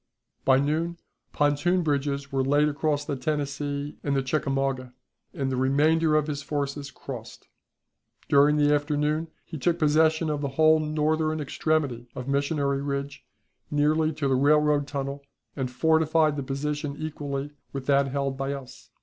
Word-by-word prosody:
By 130 -1 +6
noon 160 +5 0 0.3
pontoon 155 +5 +2
bridges 140 -2 -1
were 135 -1 +1
laid 145 +3 +3
across 150 0 -1
the 145 - -2
Tennessee 145 +1 -3
and 140 -1 0
the 135 - +1
Chickamauga, 135 -2 -1 0.4
and 135 -1 -2
the - - 0
remainder 155 +4 +3
of 155 -1 +3
his 145 -2 -3
forces 140 -1 -3
crossed. 130 - -9 0.8
During 145 +1 +5
the 145 0 +4
afternoon 150 +2 0 0.2
he 160 - -7
took 170 +6 +1
possession 155 0 +3
of 145 -1 -2
the 140 - -1
whole 155 0 +6
northern 155 +1 0
extremity 145 -4 -1
of 125 - -6
Missionary 140 0 0
Ridge 140 0 -4 0.5
nearly 155 +2 +2
to 145 -2 -2
the 135 - +2
railroad 145 +1 +3
tunnel, 140 0 -4 0.3
and 130 -3 -2
fortified 160 +3 +2
the 140 - -3
position 145 +2 -3
equally 145 -2 -4 0.2
with 135 -1 -5
that 140 0 +3
held 135 0 -2
by 135 +1 -2
us. 135 -2 -10
145 Hz, 150 wpm, -26 LUFS, 140-155 Hz, 0.8 s, By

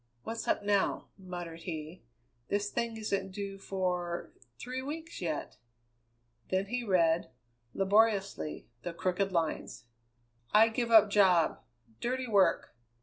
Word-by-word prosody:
"What's 230 0 -5
up - - +1
now?" 205 -1 +1
muttered 175 -3 -7
he. 160 0 -6 0.5
"This 205 +1 -1
thing 235 -1 -2
isn't 195 -3 -2
due 195 0 -5
for 180 -3 -2 0.3
three 255 +1 -5
weeks 315 +2 -6
yet." 160 -4 -3 0.9
Then 190 +1 +1
he 245 +4 -3
read, 170 -5 +2 0.5
laboriously, 195 - +2
the 175 - -5
crooked 185 +3 0
lines: 165 -7 -2 0.7
I 220 +2 +7
give 235 +1 -1
up 215 -3 +7
job. 185 -5 +4 0.4
Dirty 255 +2 -1
work. 200 - +2
195 Hz, 120 wpm, -31 LUFS, 175-220 Hz, 0.9 s, I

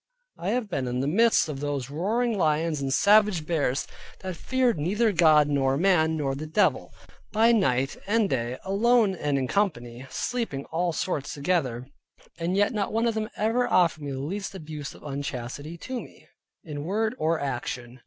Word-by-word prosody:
I 180 - -2
have 235 0 0
been 140 -9 -2
in 125 0 -2
the 135 - -1
midst 225 +7 +4
of 145 -3 -5
those 140 -2 -3
roaring 220 +9 0
lions, 155 -3 +1
and 135 -1 -2
savage 205 -1 +4
bears, 145 -5 0 0.4
that 185 -2 -5
feared 250 -1 0
neither 210 +9 +1
God, 155 -5 +5
nor 135 -2 +1
man, 160 -2 +3
nor 140 -3 -1
the 150 +3 -5
devil, 160 +7 +1 0.4
by 225 +2 +4
night 135 - +2
and 220 0 +2
day, 120 -5 -2
alone 215 +2 +3
and 145 -5 -1
in 130 -1 -1
company, 130 - -2
sleeping 230 - -3
all 175 +1 0
sorts 155 -4 -3
together, 140 -6 -1 0.5
and 175 +3 -1
yet 205 +4 +2
not 205 -3 -1
one 225 +2 +1
of 230 - +2
them 215 0 -3
ever 230 +3 +1
offered 170 -4 +3
me 145 -1 -4
the 135 - -4
least 195 +7 -4
abuse 150 -4 -7
of - - -16
unchastity 140 +2 -5
to 255 +7 -5
me, - - -15 0.4
in 150 -5 -6
word 215 +6 0
or 160 +1 +1
action. 125 -2 -4
160 Hz, 180 wpm, -26 LUFS, 140-210 Hz, 0.5 s, God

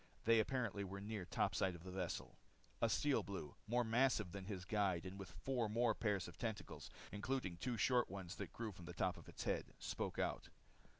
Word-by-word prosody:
They 115 0 +7
apparently 110 -4 +1
were 100 +1 -4
near 105 -2 -3
topside 95 +1 +2
of 85 - -10
the 95 - -6
vessel. 90 -2 -3 0.4
A 115 - +5
Steel 145 +4 +3
Blue, 85 -7 -5
more 120 +2 +3
massive 115 -4 +3
than 100 0 -5
his 95 -3 -4
guide 95 -4 +2
and 95 +2 -5
with 95 - -6
four 115 +6 0
more 115 +1 +4
pair 105 -1 +2
of 95 - -5
tentacles, 110 -3 -3 0.2
including 105 -4 -1
two 120 +5 -1
short 125 +4 +4
ones 95 -2 -5
that - - -4
grew 115 -2 -3
from 90 -2 -10
the - - -6
top - - +1
of - - -11
its - - -5
head, - - -1
spoke - - -2
out. - - 0
105 Hz, 200 wpm, -42 LUFS, 95-115 Hz, 0.4 s, They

